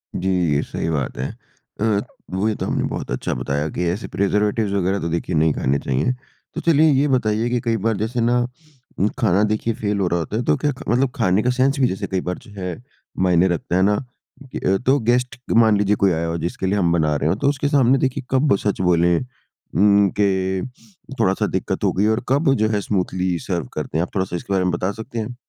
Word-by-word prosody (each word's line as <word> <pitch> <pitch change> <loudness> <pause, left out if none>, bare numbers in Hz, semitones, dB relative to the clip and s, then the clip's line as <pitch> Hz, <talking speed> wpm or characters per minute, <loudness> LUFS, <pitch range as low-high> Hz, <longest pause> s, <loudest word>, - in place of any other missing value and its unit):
जी, 95 +2 -1 0.3
ये 70 - +2
सही - - -4
बात 75 -5 -2
है। 65 +2 -2 0.5
अ, 105 -2 +2 0.3
वही 105 +3 0
तो - - -4
आपने - - -1
बहुत - - -5
अच्छा 65 - -2
बताया 70 +2 -2
कि 90 - -2
ऐसे 95 +6 -3
प्रिजर्वेटिव्स 105 +1 0
वग़ैरह 95 0 0
तो 85 - -3
देखिए 85 +1 -2
नहीं 80 0 +3
खाने 70 +1 0
चाहिए। 65 - 0 0.4
तो - - -3
चलिए 160 -1 +4
ये 140 +1 +3
बताइए 115 -3 +1
कि 125 0 0
कई 115 -3 0
बार 110 -3 +1
जैसे 115 +3 -2
ना 120 +1 +2 0.7
खाना 105 -4 +3
देखिए 110 +2 0
फेल 105 -1 -2
हो 95 - +1
रहा 85 0 0
होता 90 +7 -3
है, 120 - -1
तो 75 - +3
क्या 145 - 0
ख 130 - -9
मतलब 125 +3 +2
खाने 105 -5 +2
का 125 - +1
सेंस 130 +3 +1
भी 130 - +4
जैसे 95 - -3
कई 95 -1 -1
बार 90 - -3
जो 115 - -16
है, 90 +5 -5 0.4
मायने 90 0 +4
रखता 85 0 -2
है 95 - +3
ना 105 +1 +3 0.9
तो 135 +2 +4
गेस्ट 125 +2 0 0.2
मान 110 -2 +5
लीजिए 105 0 +2
कोई 100 -2 +2
आया 85 0 -1
हो 85 +1 -2
जिसके 85 +3 -3
लिए 100 +2 +1
हम 85 -4 +2
बना 75 -3 +2
रहे 75 +2 0
हों, 95 - +2
तो 140 +3 +2
उसके 145 0 -1
सामने 135 -2 +4
देखिए 130 -1 -1
कब 135 -2 +3
सच 100 -1 -2
बोले 85 -1 +3 0.6
उम, 100 -1 +5
कि 95 +1 0 0.5
थोड़ा-सा 95 -4 +2
दिक्कत - - -2
हो - - +3
गई 95 - +1
है 105 - +3
और 110 +2 0
कब 140 +1 +3
जो 110 -3 +2
है 105 -2 0
स्मूथली 95 -3 -1
सर्व 85 -7 -3
कर - - -3
दें। 80 - -3
आप 90 - -4
थोड़ा-सा 95 -2 -1
इसके 100 - -4
बारे 95 -1 +2
में 90 - +1
बता 90 +3 -1
सकते 110 +2 -6
हैं? 115 +3 -4
100 Hz, 230 wpm, -21 LUFS, 90-120 Hz, 0.9 s, मान